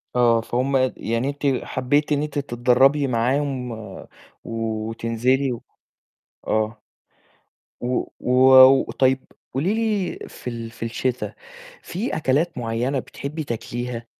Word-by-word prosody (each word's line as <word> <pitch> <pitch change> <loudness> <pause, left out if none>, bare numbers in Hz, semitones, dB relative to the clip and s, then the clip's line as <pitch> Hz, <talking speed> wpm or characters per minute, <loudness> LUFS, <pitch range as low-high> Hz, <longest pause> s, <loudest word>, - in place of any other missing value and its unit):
آه، 120 -2 +4
فهم 130 +4 -1
اد 130 -1 +2
يعني 115 +4 -1
أنتِ 140 -2 -1
حبيتِ 145 +4 0
إن 145 -1 +2
أنتِ 145 -1 -3
تتدرّبي 135 +2 +3
معاهم، 125 +1 0
و 110 -4 -8 0.4
وتنزِلي، 115 +4 -1
و 120 - -5 0.9
آه. 110 +1 -1 1.0
و 125 +1 -1 0.2
و - - -3 0.6
وطيب 130 0 +1 0.3
قولي 165 +10 +1
لي، 215 -4 -1
في 125 - -7
ال 115 -1 -6
في 115 - -7
الشتا 125 +2 -2 0.5
في 205 +8 -3
أكلات 150 +1 0
معيّنة 120 +3 -1
بتحبّي 150 +4 -6
تأكليها؟ 120 0 -5
125 Hz, 120 wpm, -23 LUFS, 115-140 Hz, 1.0 s, آه